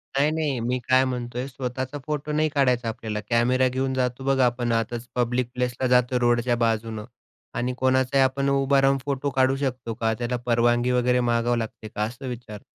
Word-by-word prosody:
नाही 140 +2 +3
नाही, 150 -5 -1
मी 125 +2 -1
काय 130 0 +5
म्हणतोय, 125 0 -4
स्वतःचा 130 +1 -4
फोटो 150 0 -3
नाही 155 +1 +1
काढायचा 125 -5 +1
आपल्याला. 110 -1 -4
कॅमेरा 125 +2 +3
घेऊन 130 +1 -1
जातो 125 0 -1
बघा 135 -2 +3
आपण, 120 -1 0
आतच 115 +1 -2
पब्लिक 125 0 0
प्लेसला 125 +1 -1
जातो, 125 0 +3
रोडच्या 120 0 +2
बाजूनं 110 -1 -2 0.5
आणि 125 +1 -1
कोणाचाही 130 +1 +3
आपण 135 +1 +1
उभा 140 0 +3
राहून 135 0 +3
फोटो 140 0 -1
काढू 130 0 +3
शकतो 130 -4 -3
का? 110 0 0
त्याला 120 +2 -2
परवानगी 120 +1 +2
वगैरे 125 0 +2
मागावी 120 0 +1
लागते 110 -1 -6
का? 105 - -3
असं 125 +5 -5
विचारतो. 115 -4 -7
125 Hz, 180 wpm, -24 LUFS, 120-130 Hz, 0.5 s, काय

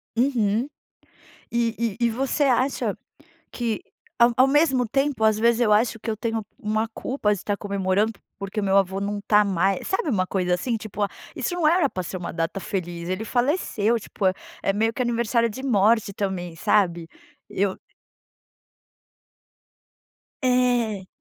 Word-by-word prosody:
Uhum, 235 -1 +1 0.8
e 230 -2 -1
e 235 - +2
e - - +3
você 265 +5 0
acha 260 0 +1 0.6
que 230 -3 -2 0.4
ao 235 0 +6
ao 260 +1 +5
mesmo 270 -4 +3
tempo 270 0 0
às 220 -1 +4
vezes 235 +1 +3
eu 215 -3 +3
acho 225 +2 +3
que 230 - -5
eu 215 - -2
tenho 225 -1 -2
uma 215 -1 0
culpa 250 -5 -1
de 205 - -5
estar 205 +2 -2
comemorando, 200 +1 0 0.3
porque 200 +2 -4
o - - -1
meu 195 0 +2
avô 195 0 +1
não 205 +1 -2
está 210 +1 +4
mais 195 0 0
sabe 380 -4 0
uma 185 -7 +1
coisa 180 -2 0
assim, 235 +6 -2
tipo 210 -1 -2 0.3
isso - - -2
não 340 -3 +2
era 325 -3 +4
pra 185 - -4
ser 185 - -5
uma 175 -3 -6
data 165 +3 -2
feliz, 175 -3 -4
ele 185 +4 -2
faleceu, 240 - +1
tipo, 200 -2 -5 0.4
é 195 - +1
meio 220 +3 +1
que 255 - -3
aniversário 235 -1 +1
de 260 +5 -8
morte 220 -3 +3
também 185 -4 -3
sabe? 170 -2 +1 0.4
Eu 195 -1 -1 2.6
É. 245 -6 +1
220 Hz, 160 wpm, -24 LUFS, 195-245 Hz, 2.6 s, ao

